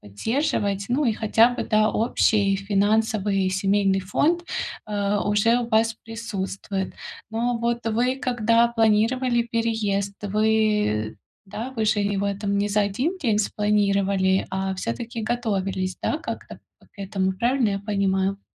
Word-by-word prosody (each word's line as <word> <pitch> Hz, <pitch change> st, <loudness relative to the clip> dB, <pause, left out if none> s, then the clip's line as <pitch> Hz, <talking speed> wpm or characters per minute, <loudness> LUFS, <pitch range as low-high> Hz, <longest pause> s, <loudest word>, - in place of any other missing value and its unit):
поддерживать. 200 Hz, -, -1 dB
Ну 275 Hz, +4 st, +1 dB
и 230 Hz, -, +2 dB
хотя 225 Hz, +2 st, +3 dB
бы, 245 Hz, -, -3 dB
да, 215 Hz, -1 st, +2 dB
общий 210 Hz, -3 st, +2 dB
финансовый 200 Hz, -1 st, +1 dB
семейный 195 Hz, 0 st, +1 dB
фонд, 315 Hz, -, +1 dB, 0.5 s
э, 205 Hz, 0 st, 0 dB
уже 210 Hz, +4 st, +2 dB
у 240 Hz, -1 st, -3 dB
вас 225 Hz, 0 st, +2 dB
присутствует. 200 Hz, -3 st, -4 dB, 0.4 s
Но 235 Hz, +1 st, -1 dB
вот 235 Hz, 0 st, -1 dB
вы 240 Hz, +4 st, +1 dB
когда 235 Hz, -3 st, +2 dB
планировали 235 Hz, +2 st, +2 dB
переезд, 210 Hz, -4 st, -1 dB
вы, 210 Hz, -, +1 dB, 0.3 s
да, 225 Hz, +6 st, -6 dB
вы 220 Hz, -, 0 dB
же 215 Hz, 0 st, +2 dB
его 200 Hz, 0 st, 0 dB
там 200 Hz, 0 st, -2 dB
не 205 Hz, +1 st, +1 dB
за 210 Hz, +1 st, +2 dB
1 260 Hz, -, -1 dB
день 225 Hz, -9 st, +1 dB
спланировали, 200 Hz, -2 st, +1 dB
а 190 Hz, 0 st, -2 dB
всё-таки 230 Hz, -, -4 dB
готовились, 195 Hz, -5 st, -2 dB
да, -, -, 0 dB
как-то -, -, -7 dB, 0.3 s
к -, -, -31 dB
этому, 190 Hz, -1 st, -1 dB
правильно 240 Hz, +2 st, +1 dB
я 195 Hz, -, -1 dB
понимаю? 195 Hz, -1 st, 0 dB
210 Hz, 135 wpm, -24 LUFS, 195-230 Hz, 0.5 s, хотя